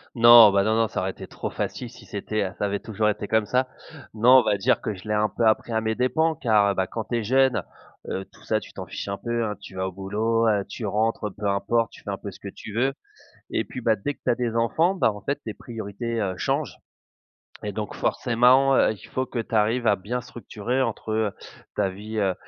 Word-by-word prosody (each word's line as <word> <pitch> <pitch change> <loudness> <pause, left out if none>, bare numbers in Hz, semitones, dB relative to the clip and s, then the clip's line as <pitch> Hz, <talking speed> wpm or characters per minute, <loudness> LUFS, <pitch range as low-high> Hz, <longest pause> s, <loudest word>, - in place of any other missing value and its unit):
Non, 120 -2 +9
ben 100 0 +3
non 110 +2 +2
non, 115 0 +3
ça 95 - -3
aurait 95 +1 -1
été - - -10
trop - - -5
facile 125 - -4
si 120 -1 -15
c'était, 105 +2 -2
heu, 95 0 -4
ça - - -1
avait 100 0 -1
toujours 110 -1 0
été 105 0 -3
comme 110 0 +2
ça. 130 +4 +1 0.5
Non, 125 +4 +7
on - - +1
va 105 -2 +1
dire 125 +5 +2
que 110 - -2
je 95 +3 -12
l'ai 105 - 0
un 105 0 +2
peu 115 - -1
appris 110 +2 +2
à 110 - +1
mes 110 0 -1
dépend, 160 +7 +1
car 105 -6 +3
bah, 95 -1 0
quand 110 +2 -5
tu 120 - -2
es - - -3
jeune, 130 +3 +3 0.5
heu, 95 - -3
tout - - -20
ça - - +1
tu - - -13
t'en - - -7
fiches - - -6
un 100 - -3
peu, 120 +1 -2
hein. 105 -1 -3
Tu 95 -1 -12
vas 95 0 -1
au - - -5
boulot, 110 +5 0
heu, 105 -3 +2
tu 115 - -6
rentres, 110 +2 0
heu, - - -7
peu 105 0 -2
importe 100 +3 +1
tu - - -14
fais - - -7
un 100 - -2
peu 100 - -7
ce - - -15
que - - -9
tu 100 +1 -9
veux 130 +5 +1 0.6
et - - 0
puis, 125 - -7
bah, 115 -2 +2
dès 145 +9 -3
que - - -36
tu - - +2
as - - +4
des 120 -2 -2
enfants, 160 +11 +2
bah, 170 - +2
en 105 - -9
fait 140 +6 -2
tes 110 - -5
priorités, 115 0 -5
heu, 95 -3 -2
changent 135 - -2 0.8
et - - -3
donc - - -5
forcément, 125 +3 +3
heu, - - +4
il 105 - -12
faut 130 - -1
que 125 - -5
tu 115 0 -4
arrives 115 +3 +2
à 105 -2 +4
bien 115 +7 -3
structurer 120 0 -3
entre, 110 -2 -3
heu, 110 -2 0 0.4
ta 100 -2 +2
vie 105 +4 -6
heu, 95 -3 +1
110 Hz, 260 wpm, -25 LUFS, 100-120 Hz, 0.8 s, Non